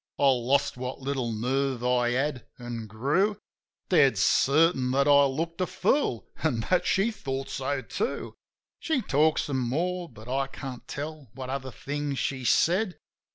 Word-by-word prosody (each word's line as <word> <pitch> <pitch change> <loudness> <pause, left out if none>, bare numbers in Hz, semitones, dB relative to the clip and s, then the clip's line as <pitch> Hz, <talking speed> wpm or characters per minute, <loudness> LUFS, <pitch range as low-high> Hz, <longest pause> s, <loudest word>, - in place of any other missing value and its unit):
I 140 - +4
lost 130 +2 +2
what 125 +1 -5
little 130 -3 -2
nerve 130 +3 -1
I 125 -1 +2
had, 135 0 -1
an' 120 -2 -6
grew 145 - +1 0.5
Dead - - +5
certain 140 -2 +3
that 140 +2 +2
I 140 -1 +7
looked 165 +6 -2
a 185 - +1
fool, 190 - 0
an' 130 -8 +1
that 180 - +3
she 200 +5 +2
thought 135 -9 -4
so, 135 0 -2
too. 445 - -3 0.5
She 310 -7 0
talked 155 -1 +3
some 135 -3 -2
more; 170 +8 -1
but 110 -1 -14
I 135 +2 0
can't 135 -2 -8
tell 150 -2 -6
what 130 -1 -5
other 135 -1 -4
things 145 +2 -4
she 130 -1 -2
said. 180 - +2
135 Hz, 155 wpm, -27 LUFS, 125-160 Hz, 0.5 s, I